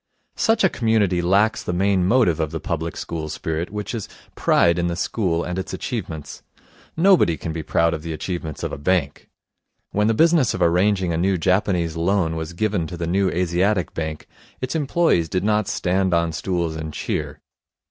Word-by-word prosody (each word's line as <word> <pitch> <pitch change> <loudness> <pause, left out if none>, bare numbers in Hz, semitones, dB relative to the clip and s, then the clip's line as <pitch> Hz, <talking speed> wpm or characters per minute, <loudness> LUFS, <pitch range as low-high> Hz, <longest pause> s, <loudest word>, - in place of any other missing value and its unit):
Such 225 -1 +2
a - - +7
community 105 - +1
lacks 100 +5 +2
the 90 - -3
main 95 0 +2
motive 105 -8 +3
of 80 -2 0
the 80 +1 -4
public 85 0 -3
school 80 -2 -5
spirit, 80 +2 -3
which 105 +2 -5
is 115 -4 -5 0.2
pride 85 0 +3
in 85 - 0
the 85 - -2
school 85 -2 -1
and 90 +1 -3
its 95 - -4
achievements. 80 - -5 0.6
Nobody 170 - +4
can 80 - -5
be 80 - -3
proud 85 +1 +1
of 80 - -4
the 85 +1 -5
achievements 80 -1 -5
of - - -2
a - - -6
bank. 75 -2 -1 0.6
When 105 +1 +1
the 115 - +2
business 160 -3 +3
of 90 - -5
arranging 90 +1 +2
a - - 0
new 95 +2 +1
Japanese 90 -2 +1
loan 85 -1 +1
was 80 +1 -5
given 100 -3 -1
to 90 - -7
the 85 - -3
New 95 +3 +1
Asiatic 90 +1 0
Bank, 80 -1 -5 0.3
its 130 0 -3
employees 150 - +1
did 90 +3 -1
not 105 -1 +1
stand 95 0 +1
on 85 0 +1
stools, 85 +1 -2
and 80 0 -5
cheer. - - -4
90 Hz, 190 wpm, -22 LUFS, 80-100 Hz, 0.6 s, a